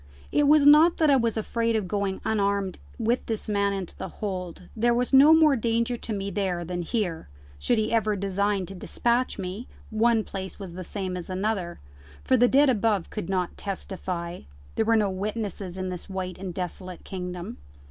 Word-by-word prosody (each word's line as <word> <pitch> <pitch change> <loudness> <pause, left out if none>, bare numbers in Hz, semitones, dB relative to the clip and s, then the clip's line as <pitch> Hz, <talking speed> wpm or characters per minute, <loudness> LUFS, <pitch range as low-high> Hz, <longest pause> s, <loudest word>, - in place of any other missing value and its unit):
It 295 -1 +3
was 300 -1 +6
not 305 +4 +7
that 310 -3 +4
I - - +6
was 230 -3 +1
afraid 230 +1 0
of 210 -4 -1
going 200 -1 -2
unarmed 200 -3 0 0.2
with 235 +2 0
this 225 -2 -3
man 200 -1 +1
into 195 -3 -5
the - - -5
hold: 185 -4 -5
there 235 +1 +2
was 250 +2 -1
no 280 +3 +8
more 315 -3 +6
danger 235 +1 0
to 230 - -6
me 200 -1 -3
there 180 -3 -1
than 175 +1 -3
here: 175 - -2 0.3
should 240 - +1
he 220 +1 0
ever 215 -2 +2
design 200 0 0
to 195 - -8
despatch 235 +6 0
me, 190 +6 -5 0.2
one 225 0 +3
place 190 -2 -6
was 190 -4 -8
the 185 +1 -6
same 185 0 -4
as 180 0 -6
another, 190 -1 -2 0.5
for 260 - +3
the 245 0 +5
dead 280 +4 +5
above 215 -6 +1
could 210 -5 -5
not 185 -2 -1
testify: 180 -3 -5 0.3
there 220 - 0
were 225 +1 +4
no 210 -3 +2
witnesses 195 -2 -4
in 185 0 -3
this 180 +1 -6
white 185 -1 -4
and 185 -2 -6
desolate 180 0 -5
kingdom. 180 - -6
200 Hz, 190 wpm, -26 LUFS, 185-230 Hz, 0.5 s, no